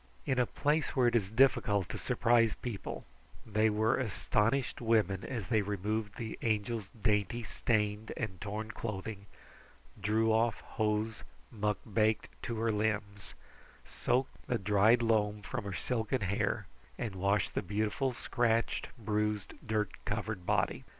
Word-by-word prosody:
In 130 -1 +1
a 125 - +3
place 150 +1 0
where 130 -2 +4
it 120 0 +3
is 100 -5 +2
difficult 110 -5 +3
to - - -4
surprise 115 -2 +3
people, 115 -6 -5 0.4
they 110 +1 +2
were 110 +3 +2
astonished 115 +2 0
women 110 -5 +2
as 115 -6 -4
they 110 -3 +3
removed 105 +2 -2
the 115 -3 -5
Angel's 110 -1 -1
dainty 105 +2 +1
stained 105 -1 0
and 95 -5 -4
torn 105 +2 -4
clothing, 100 -2 -5 0.7
drew 110 +2 +2
off 115 -1 +2
hose 110 0 -1 0.3
muck 105 -3 0
baked 110 0 +1 0.2
to 115 - -2
her 115 +1 +1
limbs, 105 -3 -2 0.5
soaked 130 +2 -1
the 120 - +1
dried 105 +4 +4
loam 105 -2 +1
from 125 0 -4
her 100 - -3
silken 120 +3 -1
hair, 100 0 0 0.3
and 110 -4 -3
washed 100 +2 +1
the - - 0
beautiful 105 +7 0
scratched, 115 -1 0
bruised, 105 -2 -1
dirt 110 -1 0
covered 105 -2 -3
body. - - +1
110 Hz, 140 wpm, -32 LUFS, 105-115 Hz, 0.7 s, where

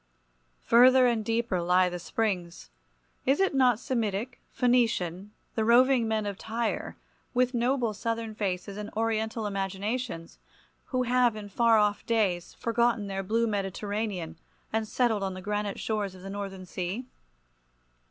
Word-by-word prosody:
Further 255 +2 +6
and 235 -3 +2
deeper 225 -4 0
lie 180 +1 +4
the 180 0 -4
springs. 180 - -3 0.6
Is 270 +2 +3
it 385 -4 +2
not 250 -4 +4
Semitic, 235 -2 -2
Phoenician, 225 -7 +1 0.2
the 220 - 0
roving 245 +1 +5
men 220 -1 0
of 200 -2 -4
Tyre, 225 0 -3 0.4
with 250 +1 +2
noble 240 -1 +1
Southern 230 +1 -3
faces 195 -1 -3
and 210 0 -5
Oriental 220 0 -1
imaginations, 195 -1 -3 0.5
who 255 -1 0
have 245 -2 +3
in 210 -1 -7
far 230 +2 +4
off 210 -1 +2
days 200 -7 0
forgotten 235 -2 +1
their 195 -1 -3
blue 225 +4 +1
Mediterranean 200 -4 -3 0.3
and 220 0 0
settled 225 -3 +1
on 190 -1 -2
the - - -6
granite 205 +1 -3
shores 205 -4 -2
of 185 - -13
the 195 - -6
Northern 195 -2 -6
Sea? 185 +7 -4
215 Hz, 145 wpm, -28 LUFS, 195-235 Hz, 0.6 s, Further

